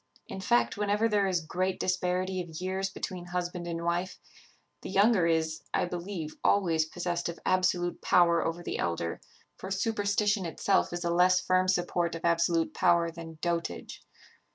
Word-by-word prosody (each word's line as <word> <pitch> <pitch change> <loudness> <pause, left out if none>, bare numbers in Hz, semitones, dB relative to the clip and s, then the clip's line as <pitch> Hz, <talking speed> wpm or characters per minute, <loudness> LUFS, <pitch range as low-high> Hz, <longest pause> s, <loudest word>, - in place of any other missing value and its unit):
In 190 - -6
fact, 120 -7 +2
whenever 210 +2 +1
there 205 -3 +2
is 175 -4 -1
great 185 +3 -1
disparity 185 0 0
of 165 -3 -8
years 190 +1 -2
between 185 -2 -6
husband 175 0 -4
and 170 0 -4
wife, 175 +2 -1 0.6
the - - -7
younger 195 -2 +4
is, 160 -1 0
I - - +2
believe, 175 -3 -5
always 165 -6 +3
possessed 175 +1 -3
of 170 - -6
absolute 185 -1 +1
power 170 -2 +4
over 170 +1 -3
the - - -4
elder; 85 0 -2 0.4
for 190 - -7
superstition 205 0 0
itself 180 +3 +1
is 175 0 -4
a 170 - 0
less 180 +1 +4
firm 185 0 +2
support 175 -2 0
of 165 - -6
absolute 170 -1 +2
power 170 -2 +3
than 165 -1 -9
dotage. 170 - -3
175 Hz, 160 wpm, -29 LUFS, 170-185 Hz, 0.6 s, younger